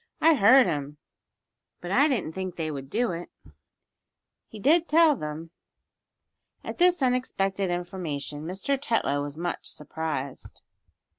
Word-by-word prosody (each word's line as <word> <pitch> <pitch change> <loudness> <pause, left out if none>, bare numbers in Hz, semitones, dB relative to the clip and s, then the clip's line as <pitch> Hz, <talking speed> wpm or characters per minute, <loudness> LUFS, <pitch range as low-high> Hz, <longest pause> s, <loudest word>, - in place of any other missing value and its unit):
"I 325 +1 +6
heard 255 +1 +6
him, 150 -4 -3 0.8
but 175 - -7
I 280 +8 +5
didn't 225 - -1
think 185 -1 -5
they 160 -2 -3
would 135 -2 -7
do 230 +4 0
it. 170 0 -6 1.2
He 220 - -11
did 325 - +3
tell 320 -1 +5
them." 155 - -6 1.1
At - - -7
this 355 -4 +4
unexpected 200 -7 0
information 175 -5 -4
Mr. 200 +10 -1
Tetlow 180 - 0
was 145 +1 -6
much 175 +1 -4
surprised. 150 -3 -5
185 Hz, 130 wpm, -26 LUFS, 155-255 Hz, 1.2 s, I